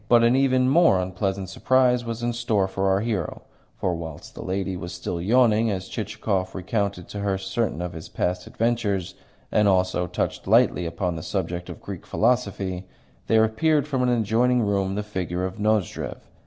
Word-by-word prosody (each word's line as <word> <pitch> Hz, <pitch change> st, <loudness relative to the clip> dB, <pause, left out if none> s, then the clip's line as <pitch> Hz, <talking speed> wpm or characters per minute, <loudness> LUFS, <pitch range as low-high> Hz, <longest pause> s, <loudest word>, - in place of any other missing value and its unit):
But 120 Hz, -1 st, +6 dB
an 120 Hz, +2 st, +5 dB
even 130 Hz, -1 st, +3 dB
more 160 Hz, -, +5 dB
unpleasant 95 Hz, +1 st, -2 dB
surprise 125 Hz, +5 st, +2 dB
was 115 Hz, 0 st, -5 dB
in 120 Hz, 0 st, 0 dB
store 115 Hz, -5 st, +1 dB
for 95 Hz, 0 st, 0 dB
our 95 Hz, +1 st, +2 dB
hero; 105 Hz, -7 st, -3 dB, 0.3 s
for 90 Hz, -, 0 dB
whilst 80 Hz, -3 st, -7 dB
the -, -, -8 dB
young -, -, -7 dB
lady 95 Hz, 0 st, -1 dB
was 90 Hz, 0 st, -6 dB
still 85 Hz, 0 st, -4 dB
yawning 115 Hz, +2 st, +4 dB
as 95 Hz, -2 st, -3 dB
Chichikov 95 Hz, -3 st, -2 dB
recounted 100 Hz, -1 st, -2 dB
to 100 Hz, -, -6 dB
her 100 Hz, -1 st, 0 dB
certain 95 Hz, -2 st, -2 dB
of 90 Hz, 0 st, -4 dB
his 80 Hz, -1 st, -8 dB
past 90 Hz, 0 st, -2 dB
adventures 105 Hz, -5 st, -1 dB, 0.4 s
and 105 Hz, -1 st, +3 dB
also 90 Hz, -2 st, +2 dB
touched -, -, -3 dB
lightly 90 Hz, -, +4 dB
upon 85 Hz, +1 st, -2 dB
the -, -, -5 dB
subject 90 Hz, -1 st, -3 dB
of -, -, -8 dB
Greek -, -, -7 dB
philosophy, 100 Hz, -6 st, 0 dB, 0.4 s
there 110 Hz, -1 st, +5 dB
appeared 150 Hz, +7 st, +2 dB
from 135 Hz, -4 st, 0 dB
an 125 Hz, -, +2 dB
adjoining 120 Hz, +1 st, +2 dB
room 100 Hz, -2 st, 0 dB
the 105 Hz, -, -2 dB
figure 90 Hz, -3 st, -3 dB
of 95 Hz, +1 st, -6 dB
Nozdrev. 105 Hz, -3 st, 0 dB
100 Hz, 180 wpm, -24 LUFS, 90-115 Hz, 0.4 s, But